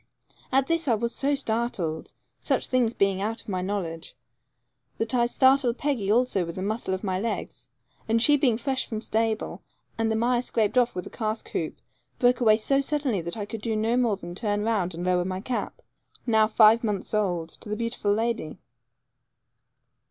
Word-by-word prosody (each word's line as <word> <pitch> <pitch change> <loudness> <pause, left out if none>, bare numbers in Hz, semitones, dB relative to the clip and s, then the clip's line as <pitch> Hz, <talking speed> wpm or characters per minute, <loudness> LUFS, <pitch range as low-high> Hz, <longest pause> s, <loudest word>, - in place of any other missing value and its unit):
At 270 0 +3
this 330 +1 0
I 235 - +4
was 235 +2 -2
so 285 +1 +1
startled, 220 - -2 0.2
such - - 0
things 245 -3 +1
beings 195 -1 +1
out 225 +3 -2
of - - -12
my 185 -2 -1
knowledge, 180 -4 -4 0.8
that 225 +1 -1
I 240 -1 +3
startled 260 -1 +3
Peggy 250 -9 -1
also 235 -4 +2
with 170 0 -6
the 185 - -4
muscle 210 -2 -1
of 190 - -8
my 185 -2 -1
legs, 195 - -4 0.4
and 225 +1 +3
she 290 +6 +5
being 260 -6 +2
fresh 265 +2 -1
from 220 - -4
stable, 220 0 -1 0.4
and 225 0 +1
the - - +1
mire 240 +2 +2
scraped 225 -2 0
off 245 -4 +3
with 180 - -5
cask 220 -1 -3
hoop, - - -3 0.4
broke 250 0 +3
away 215 -2 +5
so 275 +5 +1
suddenly 275 - -1
that 170 +5 -5
I 205 - -3
could 220 +1 -7
do 225 0 -1
no 220 +2 +1
more 235 -5 +2
than 175 -2 -8
turn 205 +1 -1
round 200 -6 0
and 175 +2 -4
lower 180 -1 +2
my 185 +1 -3
cap, 245 +5 -4 0.4
now 220 -3 +4
five 220 +1 +5
months 205 -3 -2
old, 180 -6 0
to 210 - -11
the 210 - -2
beautiful 230 -3 -1
lady. 225 -5 -1
220 Hz, 190 wpm, -26 LUFS, 195-240 Hz, 0.8 s, she